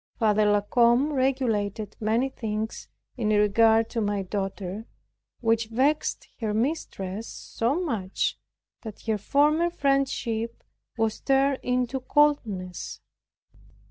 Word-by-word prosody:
Father 215 -2 +3
La 205 0 +3
Combe 240 +7 +3
regulated 225 -6 0
many 225 +4 +1
things 220 -3 -4 0.3
in 220 -3 0
regard 220 +2 +4
to 230 - -1
my 205 -1 -1
daughter, 195 +2 -4 0.5
which 225 -1 +2
vexed 270 +7 0
her 215 -3 -1
mistress 220 - -2
so 245 +8 -2
much, 220 - -1 0.5
that 220 -3 -9
her 220 -2 -1
former 300 - +3
friendship 265 -6 -1 0.3
was 225 -1 0
turned 270 0 +2
into 250 +1 0
coldness. 235 - 0
225 Hz, 110 wpm, -26 LUFS, 210-265 Hz, 0.5 s, regard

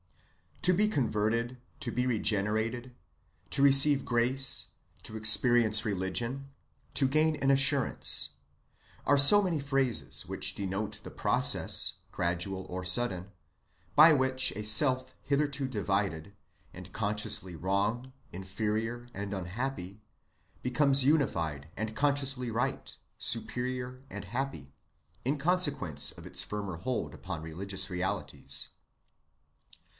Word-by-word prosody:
To 180 - +4
be 210 +4 +3
converted, 115 - -1 0.2
to 120 - -3
be 125 +2 -1
regenerated, 110 +2 -1 0.6
to - - -1
receive 140 0 +6
grace, 130 +3 +1 0.4
to 110 - -6
experience 110 0 +4
religion, 115 +7 -3 0.5
to 135 - +3
gain 155 +3 +2
an 135 -2 0
assurance, 135 0 +3 0.8
are 145 - +4
so 205 +9 +7
many 170 -5 -1
phrases 135 -4 0
which - - +1
denote 100 +2 -3
the - - -9
process, - - +2 0.2
gradual 90 +2 -2
or 90 +1 -5
sudden, 95 -1 -1 0.6
by 155 +2 +8
which 130 -2 +1
a 105 - -5
self 130 +3 +2
hitherto 140 -1 0
divided, 100 -6 -2 0.4
and - - -11
consciously 100 -3 0
wrong 100 +9 -1 0.2
inferior 110 +6 -3
and 100 0 -5
unhappy, 100 +1 -5 0.6
becomes 135 +1 +3
unified 85 - 0
and 110 +1 -4
consciously 135 -3 +1
right 125 +4 -3 0.2
superior 125 +1 -2
and 105 -1 -7
happy, 105 - -5 0.5
in 140 +4 0
consequence 140 - 0
of - - -13
its - - -1
firmer 100 -4 -5
hold 125 +9 -3
upon 90 -4 -7
religious 95 +6 -2
realities. 75 -6 -2
120 Hz, 110 wpm, -30 LUFS, 100-135 Hz, 0.8 s, by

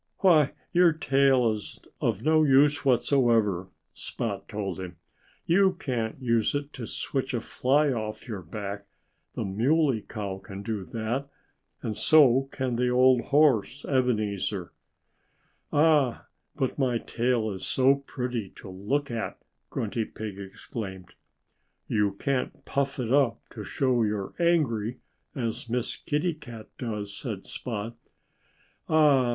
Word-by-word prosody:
"Why, 160 -8 +5 0.2
your 175 -2 +5
tail 135 -5 +3
is 105 -1 -6 0.2
of 110 -2 0
no 155 0 +4
use 145 +1 +4
whatsoever," 115 -8 +2 0.3
Spot 105 -4 -5
told 100 -4 -4
him. 90 -2 -7 0.5
"You 190 +2 +4
can't 120 -10 -3
use 115 -1 +1
it 145 0 -3
to 115 -3 -6
switch 130 +2 -3
a - - 0
fly 140 +6 +2
off 110 -1 -5
your 105 -5 -5
back. 100 +3 -6 0.5
The - - -2
Muley 125 +5 +2
Cow 100 -3 -5
can 100 +1 -9
do 105 -2 -3
that. 120 +7 -3 0.5
And 110 - -2
so 135 -3 +5
can 130 -3 -2
the 125 0 +2
old 125 0 +4
horse, 140 -3 +3
Ebenezer." 105 -8 0 1.0
"Ah! 145 -5 +3 0.3
But 130 0 -2
my 125 -3 +2
tail 115 -2 0
is 95 -1 -6
so 130 +1 +4
pretty 125 -6 -4
to 95 - -10
look 120 +10 -2
at!" 115 -1 -3 0.3
Grunty 110 +1 -2
Pig 105 -3 -7
exclaimed. 95 -2 -7 0.7
"You 105 -2 +1
can't 135 +5 -2
puff 140 0 -1
it 120 -3 -2
up 135 -5 +3
to 110 - -7
show 125 +3 +1
you're 105 -3 -1
angry, 130 -10 +1 0.4
as 115 -2 -3
Miss 120 0 -1
Kitty 155 +4 -1
Cat 120 -8 -11
does," 105 -5 -4
said 105 -6 -5
Spot. 115 -1 -5 0.9
"Ah! 145 -5 +5
120 Hz, 135 wpm, -27 LUFS, 105-140 Hz, 1.0 s, Why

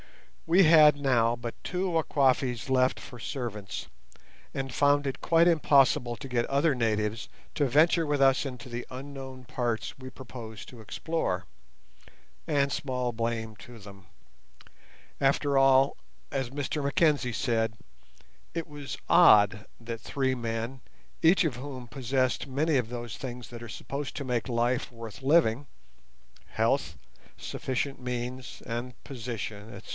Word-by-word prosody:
We 180 +4 +6
had 155 -3 +7
now 120 -4 +2
but 120 -1 -5
two 185 +1 -1
Wakwafis 135 -6 +1
left 130 0 +2
for 125 - -11
servants, 110 - -5 0.7
and 135 -2 -4
found 145 +1 +3
it 135 - -4
quite 165 0 +4
impossible 135 -7 +3
to - - -8
get 120 -2 +1
other 140 +1 +2
natives 110 -2 -1 0.3
to 145 -3 +2
venture 160 +5 +4
with 145 -1 0
us 135 +1 +4
into 125 -3 -7
the 120 0 -5
unknown 130 -1 -8
parts 120 -1 -2
we 130 0 -8
proposed 115 -4 -9
to 120 -3 -12
explore—and 140 - -4
small 125 -3 -2
blame 115 -1 -2
to 120 +3 -12
them. 100 -3 -13 1.1
After 140 +1 +2
all, 135 0 +5 0.4
as 135 -3 -2
Mr 145 +2 -3
Mackenzie 140 -2 +2
said, 110 -1 0 0.8
it 165 -1 -3
was 145 -2 -7
odd 105 - +6
that 115 -1 -6
three 130 +1 -1
men, 115 +2 -4 0.4
each 170 +2 +5
of 135 -6 -1
whom 130 -2 -7
possessed 130 +1 0
many 145 +4 +1
of 125 -4 +1
those 120 -2 -6
things 125 -3 -7
that 120 -1 -9
are 120 - -8
supposed 140 +5 -5
to 140 - -4
make 125 0 -1
life 120 +1 0
worth 115 -2 -9
living—health, 110 - -1 0.4
sufficient 135 +1 -3
means, 125 0 -5
and 120 +1 -5
position, 115 -4 -6
etc. - - -11
130 Hz, 135 wpm, -28 LUFS, 115-140 Hz, 1.1 s, had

